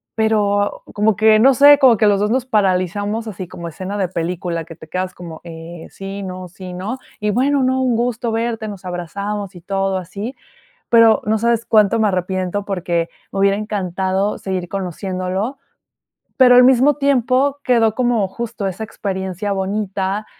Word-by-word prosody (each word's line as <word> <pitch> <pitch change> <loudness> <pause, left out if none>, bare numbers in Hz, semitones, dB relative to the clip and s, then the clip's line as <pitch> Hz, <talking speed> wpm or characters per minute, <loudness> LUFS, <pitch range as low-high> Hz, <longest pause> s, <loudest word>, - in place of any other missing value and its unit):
pero 205 -2 +1
como 210 0 +2
que, 215 +1 +5
no 265 +5 +6
sé, 285 +2 +7
como 255 -5 +6
que 215 - +3
los 200 -1 +3
2 210 +1 +1
nos 255 0 0
paralizamos 205 0 0
así 185 -3 -6
como 175 -1 -8
escena 185 +5 -5
de 190 -3 -1
película, 170 -1 -3
que 165 0 -11
te 160 - -13
quedas, 185 +1 -3
como, 170 -2 -9
eh, 165 0 -9
sí, 195 +1 -7
no, 185 -1 -6
sí, 180 +1 -9
no. 205 +8 -5 0.2
Y: 210 0 0
"Bueno, 270 +4 +2
no, 260 +1 +1
un 255 -2 +1
gusto 235 0 -1
verte", 225 -1 -2
nos 200 -3 -8
abrazamos 200 +3 -5
y 175 - -11
todo 195 +1 -1
así, 200 +8 -6 0.6
pero 230 -2 +6
no 215 +1 +2
sabes 235 +1 0
cuánto 215 +1 +3
me 215 - +3
arrepiento 185 +1 -2
porque 175 -4 -2 0.2
me 195 - -2
hubiera 200 0 +3
encantado 195 -1 -1
seguir 185 -2 -3
conociéndolo. 190 - -3 0.8
Pero 250 -2 +7
al 250 - +8
mismo 260 +3 +5
tiempo, 275 0 +2
quedó 230 -3 +3
como, 240 -5 +1
justo 230 -1 -4
esa 190 +3 -5
experiencia 190 -1 -4
bonita, 195 +1 -2
205 Hz, 170 wpm, -19 LUFS, 185-230 Hz, 0.8 s, al